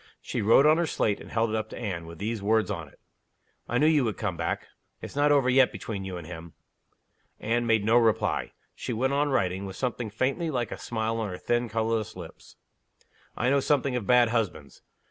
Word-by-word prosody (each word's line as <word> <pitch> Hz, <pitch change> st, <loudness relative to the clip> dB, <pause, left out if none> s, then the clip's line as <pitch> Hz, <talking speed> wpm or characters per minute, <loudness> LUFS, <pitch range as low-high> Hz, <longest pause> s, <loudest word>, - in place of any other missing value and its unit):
She -, -, -4 dB
wrote 115 Hz, +7 st, +5 dB
on 155 Hz, +1 st, +6 dB
her 170 Hz, -, +1 dB
slate, 105 Hz, -8 st, 0 dB
and -, -, -11 dB
held 115 Hz, -1 st, 0 dB
it -, -, -1 dB
up 110 Hz, 0 st, -2 dB
to -, -, -8 dB
Anne, 90 Hz, -7 st, -4 dB
with 85 Hz, 0 st, -10 dB
these 110 Hz, +3 st, -3 dB
words 110 Hz, +2 st, +2 dB
on 85 Hz, -3 st, -5 dB
it: -, -, -21 dB, 0.7 s
"I 120 Hz, -, +1 dB
knew 150 Hz, -, +3 dB
you 155 Hz, -3 st, +4 dB
would 110 Hz, -3 st, -2 dB
come 105 Hz, -5 st, -2 dB
back. 85 Hz, 0 st, -2 dB, 0.3 s
It's -, -, -9 dB
not 145 Hz, +1 st, +3 dB
over 140 Hz, -3 st, +4 dB
yet 130 Hz, 0 st, +5 dB
between 100 Hz, -4 st, -5 dB
you 95 Hz, -2 st, -5 dB
and 85 Hz, -, -8 dB
him." 85 Hz, -1 st, -9 dB, 0.9 s
Anne 120 Hz, +2 st, 0 dB
made 110 Hz, -3 st, +2 dB
no 115 Hz, +2 st, +5 dB
reply. 115 Hz, -3 st, +1 dB, 0.2 s
She 125 Hz, -, -5 dB
went 130 Hz, +4 st, 0 dB
on 145 Hz, +1 st, +1 dB
writing, 95 Hz, -7 st, 0 dB
with 95 Hz, -, -8 dB
something 125 Hz, -3 st, -3 dB
faintly 135 Hz, -, -1 dB
like 125 Hz, -5 st, -2 dB
a -, -, -6 dB
smile 115 Hz, -1 st, -2 dB
on 110 Hz, -2 st, -2 dB
her 90 Hz, -, -5 dB
thin, 120 Hz, +3 st, -1 dB
colorless 110 Hz, 0 st, -1 dB
lips. 85 Hz, -3 st, -11 dB, 0.8 s
"I 125 Hz, -, +1 dB
know 140 Hz, -, +4 dB
something 140 Hz, -2 st, +1 dB
of 115 Hz, -6 st, -3 dB
bad 125 Hz, -2 st, +5 dB
husbands. 110 Hz, -5 st, -3 dB
115 Hz, 220 wpm, -27 LUFS, 100-125 Hz, 0.9 s, on